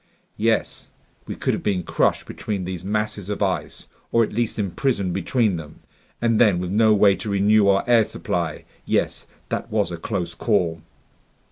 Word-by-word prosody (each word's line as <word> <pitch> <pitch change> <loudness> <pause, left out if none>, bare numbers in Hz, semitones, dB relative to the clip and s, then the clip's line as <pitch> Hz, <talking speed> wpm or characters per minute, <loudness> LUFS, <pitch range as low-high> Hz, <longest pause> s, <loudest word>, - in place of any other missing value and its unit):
"Yes. - - 0 0.4
We - - -4
could - - -1
have - - -2
been 95 -4 0
crushed - - +1
between 100 -3 -4
these 90 -1 -5
masses 105 -1 -2
of 105 0 -1
ice, 95 -2 -3 0.2
or 115 - +4
at 105 - -4
least 115 +1 -1
imprisoned 100 -1 -1
between 100 +1 +1
them. 80 -1 -10 0.4
And 115 -1 +2
then, 105 -6 +5
with 90 0 -3
no 110 +2 +4
way 100 -1 +5
to 110 - -5
renew 100 +1 +4
our 100 0 +4
air 120 -2 +5
supply.... 85 -6 -3 0.2
Yes, - - -1 0.2
that - - -3
was 105 -4 0
a 85 - -4
close 85 -2 -3
call!" 85 -4 0
100 Hz, 170 wpm, -23 LUFS, 90-110 Hz, 0.4 s, then